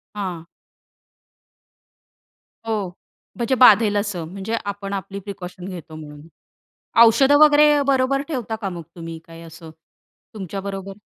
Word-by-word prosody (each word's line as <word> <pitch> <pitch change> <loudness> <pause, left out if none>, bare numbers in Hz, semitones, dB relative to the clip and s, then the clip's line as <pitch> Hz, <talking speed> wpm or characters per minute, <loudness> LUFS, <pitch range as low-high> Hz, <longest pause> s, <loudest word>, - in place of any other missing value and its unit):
हां. 180 -5 -5 2.2
हो. 210 -5 -2 0.5
म्हणजे 245 +2 0
बाधेल 215 -3 +6
असं. 200 -5 -3
म्हणजे 195 +5 -4
आपण 200 0 -5
आपली 195 0 -5
प्रिकॉशन 185 -2 -9
घेतो 175 -4 -9
म्हणून. 150 0 -11 0.7
औषधं 270 +5 +6
वगैरे 295 -1 +5
बरोबर 275 0 +2
ठेवता 240 -7 -4
का 195 - -2
मग 170 -2 -7
तुम्ही, 165 -1 -8
काय 165 0 -12
असं 165 0 -12 0.6
तुमच्या 195 -2 -6
बरोबर? 195 0 -7
200 Hz, 120 wpm, -21 LUFS, 175-230 Hz, 2.2 s, बाधेल